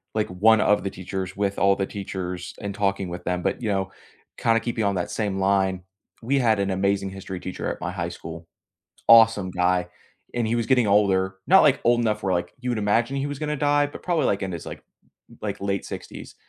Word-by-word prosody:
like, 110 -1 +1
one 110 +5 +4
of 105 -3 +3
the 100 - -2
teachers 95 0 -6
with 100 -1 -1
all 100 0 +4
the 95 - -1
teachers 90 -3 -6
and 100 -1 -4
talking 100 -2 -1
with 90 0 -7
them. 90 -1 -1
But, - - -1
you 110 - -2
know, 95 -1 -1 0.5
kinda 115 0 +2
keeping 115 -2 -2
on 100 -1 +1
that 90 - -2
same 100 -3 -2
line, 95 -1 +1 0.4
we 135 +4 +1
had 110 -5 +2
an 100 -1 0
amazing 100 0 0
History 95 -1 -7
teacher 95 - -4
at - - -7
my 90 0 -3
high 85 -2 -3
school, 85 -1 -9 0.6
awesome 115 -4 +6
guy, 90 0 +1 0.5
and 120 -2 0
he 115 - 0
was 115 -1 -1
getting 125 -4 +3
older 95 -2 +2
not, 190 +1 +7
like, 145 -2 +4
old 120 0 +4
enough 110 -2 0
where, 95 -1 +1
like, 90 0 -2
you 125 -1 -2
would 120 - -1
imagine 115 +6 +1
he 135 +1 -1
was 145 -1 -5
gonna 150 0 -2
die, 145 0 +2
but 145 - -11
probably, 175 -3 +1
like, 100 - 0
in 95 -1 -3
his, 85 - -7
like, - - -8 0.6
like, 100 -2 -4
late 100 -1 -2
60s - - -8
100 Hz, 220 wpm, -24 LUFS, 95-115 Hz, 0.6 s, not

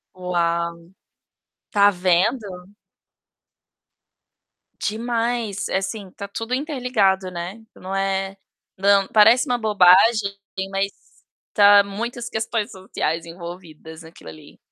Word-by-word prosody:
Uau. 170 -2 -2 0.9
Tá 205 -1 +5
vendo! 185 +1 -1 2.1
Demais. 230 -1 -2
É, - - +1
assim, 195 0 -5
tá 200 +2 -8
tudo 225 +4 -5
interligado, 250 - 0
né. 180 +6 -7
Não 190 +1 -6
é 195 0 -2 0.4
não 195 0 +3
parece 225 +7 +5
uma 245 -2 0
bobagem, 205 0 +4 0.3
mas 195 0 -1 0.6
tá 205 -1 +7
muitas 235 +4 -5
questões 220 -1 -3
sociais 170 -3 -4
envolvidas 170 -2 -10
naquilo 160 - -13
ali. 80 -1 -14
195 Hz, 100 wpm, -22 LUFS, 180-220 Hz, 2.1 s, tá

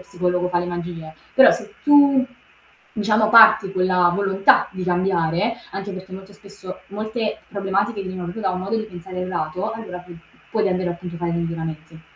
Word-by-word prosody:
psicologo 180 -1 -2
fa 175 - 0
le - - -3
magie, 170 -2 -6 0.2
però 265 - +8
se 215 -3 -4
tu, 285 -3 +5 0.7
diciamo 215 0 +2
parti 220 -3 +7
quella 185 -1 +2
volontà 195 0 +3
di 185 -1 -7
cambiare 180 +3 0 0.2
anche 195 +1 -5
perché 185 0 -9
molto 190 +1 -10
spesso 200 -2 -11
molte 215 +2 -4
problematiche 200 +1 -2
di 185 -1 -6
neuro 175 -1 -5
tu 225 - -7
da 195 - 0
un 185 0 -3
modo 200 +4 -2
di 215 - -3
pensare 180 -2 -9
errato, 180 +3 -3
allora 220 -5 -7
pu 180 0 -13
p - - -12 0.3
puoi 215 -1 0
davvero 185 -2 0
appunto 175 0 -8
fare 170 0 -3
dei 170 - -1
miglioramenti. 160 -1 -6
185 Hz, 185 wpm, -21 LUFS, 175-210 Hz, 0.7 s, però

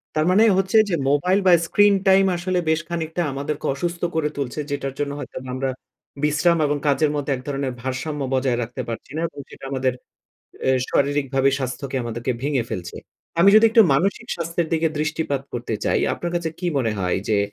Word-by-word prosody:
তার 155 0 +2
মানে 210 +4 +5
হচ্ছে 195 +3 +2
যে 175 - +1
মোবাইল 180 +7 +3
বা, - - +7 0.2
স্ক্রিন 205 +2 +5
টাইম 190 0 +6
আসলে 180 +1 -1
বেশ 160 - +3
খানিকটা 165 0 -2
আমাদেরকে 145 +2 -4
অসুস্থ 170 +4 -3
করে 155 -2 +1
তুলছে, 140 +1 -3
যেটার 135 -1 -3
জন্য 145 -1 -1
হয়তোবা 130 -2 -7
আমরা 135 0 -1 0.5
বিশ্রাম 150 +3 +3
এবং 145 0 0
কাজের 145 +1 +2
মধ্যে 145 -1 -2
এক 125 - -8
ধরনের 135 -2 -2
ভারসাম্য 135 +3 -3
বজায় 130 -2 +1
রাখতে 120 +2 -6
পারছি 115 +3 -6
না 160 - -1
এবং 145 - -12
সেটা - - -11
আমাদের 130 -2 0 0.8
এ - - +5 0.2
শারীরিকভাবে 135 -1 +1
স্বাস্থ্যকে 130 +1 -4
আমাদেরকে 120 +2 -3
ভেঙে 140 -3 +1
ফেলছে। 90 -5 -5 0.4
আমি 195 - +7
যদি 215 +1 +7
একটু 225 -1 +7
মানসিক 195 +8 0
স্বাস্থ্যের 170 -1 -2
দিকে 160 0 +2
দৃষ্টিপাত 155 -3 -1
করতে 120 -2 -3
চাই, - - +2
আপনার 175 - -4
কাছে 165 -2 -2
কি 180 - -3
মনে 115 -4 0
হয় 90 -1 0
যে, 105 -2 +3
145 Hz, 185 wpm, -22 LUFS, 130-170 Hz, 0.8 s, বা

